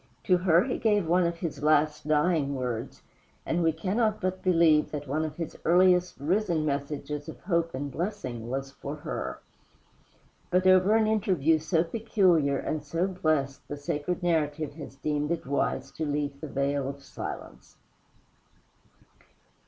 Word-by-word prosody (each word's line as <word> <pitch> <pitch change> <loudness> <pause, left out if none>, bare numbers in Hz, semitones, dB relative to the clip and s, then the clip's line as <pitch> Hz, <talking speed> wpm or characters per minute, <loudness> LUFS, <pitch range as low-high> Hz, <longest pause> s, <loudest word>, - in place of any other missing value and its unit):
To 185 - +4
her 175 -1 +4
he 250 - -2
gave 210 -5 +2
one 175 +1 +3
of 170 0 -3
his 165 -4 -5
last 150 0 +2
dying 150 -2 +2
words, 125 -3 -4 0.4
and 175 - 0
we 165 -1 +3
cannot 210 +7 0
but 185 0 -2
believe 165 -4 +4
that 145 -1 -5
one 150 +4 0
of 155 -1 -4
his 165 -2 -5
earliest 180 0 +4
risen 170 +1 +1
messages 145 0 -3
of - - -9
hope 170 -4 0
and 140 +1 -4
blessing 130 - -4
was 135 +1 -3
for 140 +1 -6
her. 150 - -5 1.1
But 180 +1 +2
over 185 +3 +5
an 225 -1 +4
interview 180 -8 +2
so 160 +1 +1
peculiar 175 -7 +2
and 155 -1 -3
so 165 +5 -1
blessed 155 -7 -1
the 145 - -5
sacred 150 +5 -3
narrative 155 -3 0
has 145 -3 -9
deemed 150 +1 -2
it 170 -1 -2
wise 135 -1 -1
to 160 - -4
leave 145 -1 -2
the 155 - -5
veil 140 0 -1
of 140 0 -8
silence. - - -8
155 Hz, 155 wpm, -28 LUFS, 145-180 Hz, 1.1 s, over